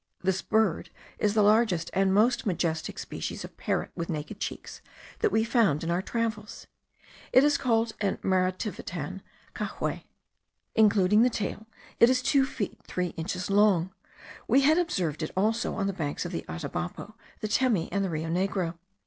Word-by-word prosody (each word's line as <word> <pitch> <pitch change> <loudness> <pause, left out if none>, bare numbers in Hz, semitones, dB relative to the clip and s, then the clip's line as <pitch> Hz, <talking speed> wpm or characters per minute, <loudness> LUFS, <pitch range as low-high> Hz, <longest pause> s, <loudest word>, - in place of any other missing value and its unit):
This 190 0 +1
bird 220 -6 +1 0.3
is 210 0 +1
the 210 - +5
largest 210 -5 +3
and 195 0 +2
most 235 +4 +3
majestic 165 -3 -1
species - - -5
of - - -13
parrot - - -2
with 170 - -5
naked 155 +6 -5
cheeks - - -6 0.4
that 435 -2 +2
we 220 - +3
found 225 - +2
in 165 - -1
our 175 +2 +1
travels. 220 0 -3 0.7
It 255 - +6
is 295 0 +4
called 225 -2 +1
in 200 -2 0
Marativitan, 185 -2 -2 0.3
cahuei. - - -4 0.7
Including 210 -1 +4
the 250 - +5
tail, 220 -1 -4 0.3
it 235 - +7
is 255 0 +2
two 270 0 +3
feet 220 -7 -4
three 180 -1 -2
inches 180 +4 -4
long. 195 -3 +3 0.5
We 275 - +5
had 310 +5 +4
observed 175 - -1
it 155 - -2
also 220 +4 +1
on 195 - -1
the 195 - -1
banks 155 -2 -3
of 175 - -4
the 170 - -4
Atabapo, 175 +5 -5 0.3
the 215 - -1
Temi, 215 -5 +2
and 200 0 0
the 190 - -1
Rio 160 0 -3
Negro. 180 -1 -1
200 Hz, 165 wpm, -28 LUFS, 175-225 Hz, 0.7 s, it